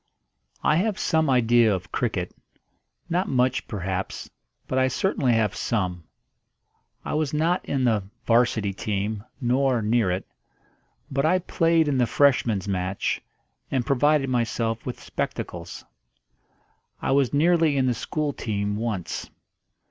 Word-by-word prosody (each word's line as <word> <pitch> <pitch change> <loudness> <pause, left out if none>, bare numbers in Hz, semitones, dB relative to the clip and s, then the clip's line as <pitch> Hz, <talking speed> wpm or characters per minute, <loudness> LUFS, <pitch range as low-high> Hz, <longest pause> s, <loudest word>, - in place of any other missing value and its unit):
I 155 - +3
have 205 +2 0
some 160 -3 +1
idea 120 -3 +4
of 95 -3 -3
cricket 100 -7 -2 0.7
not 180 +2 0
much, 130 0 +1
perhaps, 95 -3 -4 0.4
but 130 - 0
I 130 - +4
certainly 130 -2 +1
have 110 -3 +2
some. 90 -7 -2 1.0
I - - -3
was 150 -1 0
not 165 +4 +1
in 135 -2 -1
the 110 -4 +2 0.2
'Varsity 115 -4 +2
team, 105 +1 -3 0.2
nor 130 0 +2
near 110 -2 +2
it; 90 +2 -2 0.9
but 140 0 0
I 170 +4 +4
played 165 -3 +2
in 140 -3 +1
the 120 - +3
Freshman's 120 -9 +2
match, 95 0 -1 0.5
and 130 -3 0
provided 145 +1 +3
myself 115 -2 -1
with 125 - -4
spectacles. - - -5 1.1
I - - -1
was 135 -2 +3
nearly 160 0 +3
in 130 - +2
the 125 - +2
school 150 +4 -2
team 105 -3 -2
once. 105 -6 -3
125 Hz, 135 wpm, -25 LUFS, 105-145 Hz, 1.1 s, idea